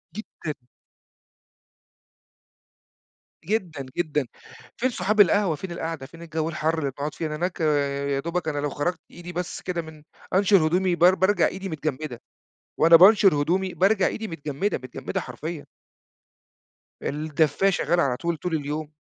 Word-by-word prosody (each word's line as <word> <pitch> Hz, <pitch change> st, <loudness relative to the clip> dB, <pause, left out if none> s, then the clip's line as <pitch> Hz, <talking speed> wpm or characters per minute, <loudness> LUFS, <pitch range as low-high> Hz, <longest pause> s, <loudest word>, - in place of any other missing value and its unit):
جدًا. 165 Hz, -7 st, -6 dB, 2.9 s
جدًا، 175 Hz, -9 st, -2 dB
جدًا، 150 Hz, -6 st, 0 dB, 0.5 s
فين 255 Hz, +2 st, +1 dB
صحاب 215 Hz, -3 st, +2 dB
القهوة، 200 Hz, -3 st, +3 dB
فين 185 Hz, +4 st, -7 dB
القعدة، 165 Hz, -4 st, -4 dB
فين 165 Hz, +4 st, -14 dB
الجو 160 Hz, -1 st, -3 dB
الحر 160 Hz, 0 st, -1 dB
اللي 140 Hz, -3 st, -2 dB
بنقعد 145 Hz, +2 st, -5 dB
فيه؟ 165 Hz, -, -4 dB
أنا 150 Hz, -, -4 dB
هناك، 175 Hz, +3 st, -3 dB
يا 140 Hz, -2 st, 0 dB
دوبك 170 Hz, +3 st, -3 dB
أنا 145 Hz, -2 st, -1 dB
لو 145 Hz, -, -1 dB
خرّجت 150 Hz, +6 st, -2 dB
إيدي 175 Hz, 0 st, -9 dB
بس 175 Hz, 0 st, -4 dB
كده 175 Hz, -2 st, -2 dB
من 155 Hz, -2 st, -13 dB, 0.3 s
أنشر 195 Hz, -4 st, +5 dB
هدومي 180 Hz, +1 st, +1 dB
بار 180 Hz, +2 st, +5 dB
بارجع 190 Hz, +3 st, +3 dB
إيدي 195 Hz, +1 st, -5 dB
متجمّدة، 155 Hz, -5 st, -4 dB, 0.6 s
وأنا 165 Hz, +1 st, +7 dB
بانشُر 195 Hz, 0 st, +7 dB
هدومي، 185 Hz, +5 st, 0 dB
بارجع 195 Hz, +1 st, +3 dB
إيدي 220 Hz, -, -4 dB
متجمّدة، 165 Hz, +3 st, -2 dB
متجمّدة 130 Hz, -1 st, -5 dB
حرفيًا. 150 Hz, +5 st, -6 dB, 1.4 s
الدفاية 155 Hz, +4 st, +1 dB
شغالة 175 Hz, -1 st, +1 dB
على 125 Hz, -3 st, 0 dB
طول، 170 Hz, +2 st, -2 dB
طول 170 Hz, +2 st, -2 dB
اليوم 150 Hz, +1 st, -4 dB
165 Hz, 140 wpm, -25 LUFS, 150-185 Hz, 2.9 s, وأنا